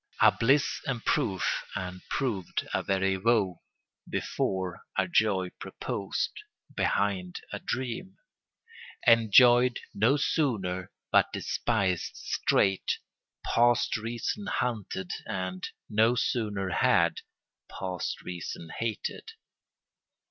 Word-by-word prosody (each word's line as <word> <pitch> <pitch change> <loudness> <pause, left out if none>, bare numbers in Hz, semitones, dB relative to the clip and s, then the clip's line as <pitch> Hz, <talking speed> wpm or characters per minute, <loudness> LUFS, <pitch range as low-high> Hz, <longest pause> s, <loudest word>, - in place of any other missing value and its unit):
A - - +7
bliss 135 +5 +2
in 125 -4 -1
proof 95 -5 0
and, 90 -2 -5
proved, 110 - -2
a - - +1
very 95 0 +1
woe: 100 -4 +1 0.5
Before, 95 -2 -2 0.2
a 95 - +2
joy 95 -1 +2
proposed; - - -3 0.4
behind, 95 -3 0
a - - -3
dream... 130 +9 -4 0.9
Enjoyed 120 +2 +6
no 120 +8 +3
sooner 95 - 0 0.2
but - - +4
despised 100 -7 -1
straight; 95 -1 +1 0.5
Past 120 0 +3
reason 120 - -3
hunted 105 - -2 0.2
and, 95 0 -3 0.2
no 110 +3 +3
sooner 105 -5 -1
had, 85 - +3 0.5
Past 90 -2 -4
reason 85 -2 -6
hated. 115 -2 -4
105 Hz, 95 wpm, -29 LUFS, 95-120 Hz, 0.9 s, A